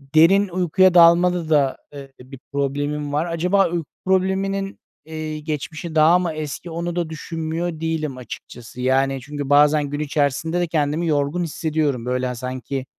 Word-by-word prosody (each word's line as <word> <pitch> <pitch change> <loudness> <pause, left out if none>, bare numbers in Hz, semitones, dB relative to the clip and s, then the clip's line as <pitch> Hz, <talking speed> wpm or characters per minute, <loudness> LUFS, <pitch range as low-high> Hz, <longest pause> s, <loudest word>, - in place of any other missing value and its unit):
derin 195 +5 +5
uykuya 185 +1 +3
dalmada 170 -1 +5
da, 140 -4 +2 0.2
eee, 135 -1 -10
bir 130 +1 -12
problemim 145 +1 -2
var. 155 +3 +1
Acaba 180 +3 +1
uyku 170 -3 -3 0.2
probleminin, 195 +1 0 0.3
eee, 155 -1 -5
geçmişi 155 +2 -5
daha 160 +3 +5
mı 175 -2 -1
eski 155 +2 -6
onu 170 +1 -3
da 170 -2 -2
düşünmüyor 160 +1 -4
değilim 155 -4 -2
açıkçası, 120 0 -10
yani, 135 +1 +1
çünkü 145 0 -6
bazen 145 +1 +5
gün 145 +1 -4
içerisinde 150 +3 0
de 175 - 0
kendimi 155 +1 0
yorgun 150 +3 0
hissediyorum. 155 -6 -1
Böyle, 125 0 -1
hani, 125 -1 -3
sanki 130 +2 -5
155 Hz, 155 wpm, -21 LUFS, 140-170 Hz, 0.3 s, derin